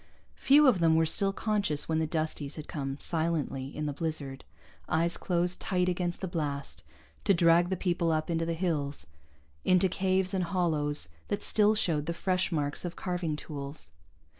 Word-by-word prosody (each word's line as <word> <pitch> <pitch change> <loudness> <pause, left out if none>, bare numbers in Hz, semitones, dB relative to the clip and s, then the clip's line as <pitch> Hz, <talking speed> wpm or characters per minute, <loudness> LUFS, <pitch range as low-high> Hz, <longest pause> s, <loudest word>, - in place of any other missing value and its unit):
Few 290 +2 +6
of 245 -9 +5
them 165 -1 +4
were 160 0 +4
still 195 +5 +2
conscious 200 -8 +1
when 160 -1 +1
the 160 - 0
Dusties 155 -2 -3
had 155 - -8
come 135 -2 -4
silently, 160 -5 -1
in 150 +2 -5
the 145 - -2
blizzard, 145 -3 -4 0.5
eyes 170 +2 +1
closed 180 -1 -1
tight 180 -1 0
against 175 -1 -2
the 190 - -2
blast, 145 -5 -4 0.4
to 200 - +4
drag 170 0 +4
the 190 - -1
people 175 -2 0
up 155 0 0
into 165 -1 0
the 165 - -1
hills, 155 -5 -2 0.6
into 185 +1 +4
caves 185 +1 0
and 185 -2 0
hollows 155 - 0 0.2
that 205 - -2
still 215 0 +4
showed 155 -7 0
the 170 - -2
fresh 185 +1 0
marks 145 -3 -1
of 175 -1 -5
carving 180 -4 -2
tools. 145 -1 -7
165 Hz, 175 wpm, -29 LUFS, 150-185 Hz, 0.6 s, Few